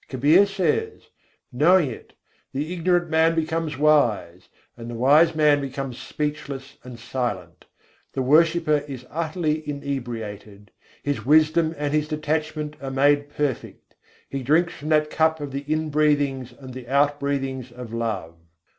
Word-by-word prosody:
Kabîr 150 Hz, +10 st, +4 dB
says: 200 Hz, -, -2 dB, 0.4 s
"Knowing 155 Hz, +2 st, +4 dB
it, -, -, -11 dB, 0.4 s
the 150 Hz, +6 st, -3 dB
ignorant 175 Hz, -1 st, +1 dB
man 160 Hz, +1 st, +3 dB
becomes 160 Hz, -2 st, -2 dB
wise, 120 Hz, -, +2 dB, 0.3 s
and 115 Hz, 0 st, -9 dB
the 120 Hz, -, -6 dB
wise 150 Hz, +7 st, +4 dB
man 150 Hz, -2 st, +4 dB
becomes 135 Hz, -2 st, -5 dB
speechless 140 Hz, -2 st, -5 dB
and 125 Hz, -2 st, -10 dB
silent, 120 Hz, -8 st, -4 dB, 0.5 s
The 135 Hz, -, -1 dB
worshipper 155 Hz, +1 st, +3 dB
is 130 Hz, -3 st, -8 dB
utterly 155 Hz, -1 st, -1 dB
inebriated, 115 Hz, -7 st, -6 dB, 0.3 s
His 145 Hz, -1 st, -2 dB
wisdom 155 Hz, +2 st, +3 dB
and 145 Hz, 0 st, -2 dB
his 150 Hz, 0 st, +1 dB
detachment 155 Hz, 0 st, -3 dB
are 135 Hz, -, -4 dB
made 145 Hz, +2 st, +2 dB
perfect; 145 Hz, -4 st, -4 dB, 0.3 s
He 135 Hz, -, -4 dB
drinks 160 Hz, +7 st, +2 dB
from 150 Hz, +1 st, -7 dB
the 155 Hz, -1 st, +5 dB
cup 160 Hz, +1 st, +1 dB
of 145 Hz, -2 st, -5 dB
the 140 Hz, +1 st, -5 dB
inbreathings 145 Hz, -4 st, +1 dB
and 130 Hz, +1 st, -12 dB
the 130 Hz, -1 st, -8 dB
outbreathings 140 Hz, -2 st, 0 dB
of 120 Hz, -2 st, -9 dB
love." 105 Hz, -8 st, -3 dB
145 Hz, 135 wpm, -23 LUFS, 130-155 Hz, 0.5 s, the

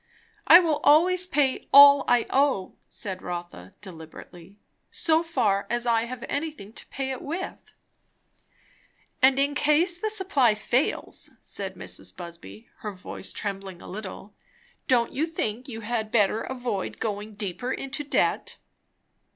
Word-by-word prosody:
"I 340 Hz, -, +10 dB
will 325 Hz, -5 st, 0 dB
always 360 Hz, +5 st, +5 dB
pay 290 Hz, -6 st, 0 dB
all 280 Hz, 0 st, +9 dB
I 240 Hz, -1 st, +3 dB
owe," 270 Hz, -9 st, +1 dB, 0.2 s
said 190 Hz, -4 st, -5 dB
Rotha 175 Hz, -, -7 dB
deliberately, 175 Hz, +1 st, -12 dB, 0.3 s
"so 320 Hz, 0 st, +2 dB
far 235 Hz, -12 st, 0 dB
as 240 Hz, 0 st, -1 dB
I 230 Hz, -1 st, +2 dB
have 245 Hz, 0 st, -7 dB
anything 285 Hz, -9 st, -5 dB
to -, -, -8 dB
pay 265 Hz, 0 st, -4 dB
it 260 Hz, -, -5 dB
with." 340 Hz, +6 st, -6 dB, 1.5 s
"And 265 Hz, +1 st, +5 dB
in 280 Hz, +1 st, +1 dB
case 320 Hz, +5 st, +2 dB
the 435 Hz, -, -1 dB
supply 355 Hz, -, +2 dB
fails," 245 Hz, +6 st, -1 dB
said -, -, -6 dB
Mrs. -, -, -9 dB
Busby, 170 Hz, -, -11 dB
her 210 Hz, -1 st, -6 dB
voice 185 Hz, +1 st, -8 dB
trembling 195 Hz, -3 st, -6 dB
a -, -, -13 dB
little, 205 Hz, +1 st, -8 dB, 0.5 s
"don't 240 Hz, -2 st, +2 dB
you 310 Hz, +4 st, 0 dB
think 250 Hz, -6 st, -3 dB
you 225 Hz, -3 st, -7 dB
had 220 Hz, 0 st, -2 dB
better 215 Hz, -1 st, +2 dB
avoid 245 Hz, -7 st, -4 dB
going 210 Hz, 0 st, -4 dB
deeper 205 Hz, +4 st, -4 dB
into 270 Hz, +3 st, -4 dB
debt?" 290 Hz, -, 0 dB
240 Hz, 140 wpm, -26 LUFS, 200-290 Hz, 1.5 s, I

